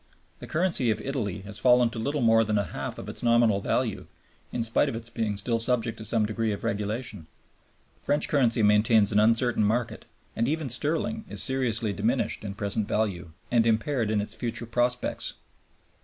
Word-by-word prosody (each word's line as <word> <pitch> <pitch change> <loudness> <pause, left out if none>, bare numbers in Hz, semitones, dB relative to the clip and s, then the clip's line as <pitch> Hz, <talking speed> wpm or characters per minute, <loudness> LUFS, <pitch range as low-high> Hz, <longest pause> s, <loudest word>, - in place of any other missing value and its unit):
The - - -9
currency 165 -7 +1
of 110 - 0
Italy 110 -8 -3
has 100 +2 -8
fallen 125 0 +4
to 115 - -6
little 140 +5 -1
more 115 -1 +5
than 105 -1 0
a 100 - +1
half 85 - -5
of - - -8
its - - -6
nominal 115 -4 +3
value - - -1 0.4
in 120 - -2
spite 115 0 +2
of - - -4
its 115 0 -6
being 110 -3 -2
still 115 +3 +1
subject 115 -1 0
to 110 - -7
some 110 0 +1
degree 110 +1 -1
of 100 - -5
regulation; 105 -3 -3 0.7
French 145 +1 +1
currency 120 -6 +2
maintains 105 0 +4
an 105 - +3
uncertain 115 +1 +3
market; 115 +3 -1 0.3
and 115 - 0
even 155 -1 -1
sterling 165 - -1
is - - +4
seriously 115 -5 0
diminished 110 +1 -1
in 100 -2 -5
present 100 0 -2
value 100 -7 -1 0.2
and 115 -1 +3
impaired 115 +1 +1
in 105 -1 +1
its 105 - -4
future 115 -1 -4
prospects. 120 +1 -1
115 Hz, 185 wpm, -27 LUFS, 105-125 Hz, 0.7 s, more